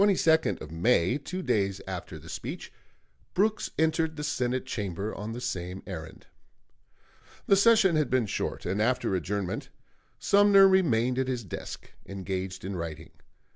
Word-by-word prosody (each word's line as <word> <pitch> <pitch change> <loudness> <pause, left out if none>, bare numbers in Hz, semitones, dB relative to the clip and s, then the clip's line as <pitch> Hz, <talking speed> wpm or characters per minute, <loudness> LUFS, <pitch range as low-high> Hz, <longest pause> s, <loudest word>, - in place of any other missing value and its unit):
On 200 - +6
the 200 - +4
22d 160 - +2
of 75 - -8
May, 90 - +2
two 180 +6 -5
days 100 -6 0
after 90 -3 -6
the 80 +1 -13
speech, - - -6 0.6
Brooks 215 +3 +1
entered 160 0 +1
the 150 - -5
Senate 130 -3 -1
Chamber 100 -4 -3
on 105 +3 -5
the 120 - -5
same 90 -4 -4
errand. 80 -4 -8 1.2
The 195 - +5
session 200 -3 +5
had 150 -4 +1
been 130 -3 +2
short, 100 - -3
and 95 +4 -1
after 125 -3 +1
adjournment 95 +1 -2 0.5
Sumner 200 -1 +6
remained 130 -10 +2
at 130 - 0
his 125 -3 -2
desk, 95 - -8 0.2
engaged 95 -1 -4
in 95 0 -4
writing. 80 -2 -6
115 Hz, 155 wpm, -28 LUFS, 95-160 Hz, 1.2 s, On